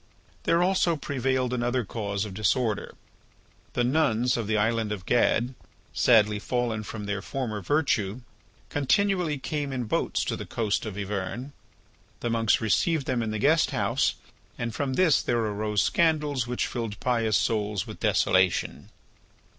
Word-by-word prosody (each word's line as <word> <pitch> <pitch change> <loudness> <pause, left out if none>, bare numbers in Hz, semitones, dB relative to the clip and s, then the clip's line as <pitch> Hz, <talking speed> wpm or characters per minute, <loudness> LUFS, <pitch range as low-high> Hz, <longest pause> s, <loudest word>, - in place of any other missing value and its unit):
There 170 +1 +3
also 180 -2 +2
prevailed 130 -3 -1
another 120 0 0
cause 100 -1 -3
of 100 - -7
disorder. 110 +1 0 0.8
The 125 - +1
nuns 125 -3 +2
of 115 -3 -2
the 110 0 +1
island 110 0 +1
of 95 -4 -5
Gad, 120 +1 +2 0.4
sadly 105 -3 +4
fallen 120 -1 -1
from 105 0 -7
their 100 -1 -2
former 115 -5 -4
virtue, 115 - 0 0.5
continually 180 +1 +1
came 145 +1 -3
in 130 -2 -2
boats 110 - -1
to - - -1
the - - -7
coast 110 -1 -1
of 105 -2 -6
Yvern. 105 +6 -4 0.7
The 120 - -1
monks 115 -2 +2
received 140 - +1
them 125 -2 0
in 110 - -2
the 110 - -2
guesthouse 155 +8 +2 0.4
and 115 -1 -3
from 130 +2 -2
this 170 -3 +4
there 120 - 0
arose 105 -2 0
scandals 150 -6 +1
which 125 0 -1
filled 115 -4 -4
pious 115 -4 +1
souls 105 -3 0
with - - -9
desolation. 95 -1 +1
120 Hz, 145 wpm, -27 LUFS, 105-135 Hz, 0.8 s, sadly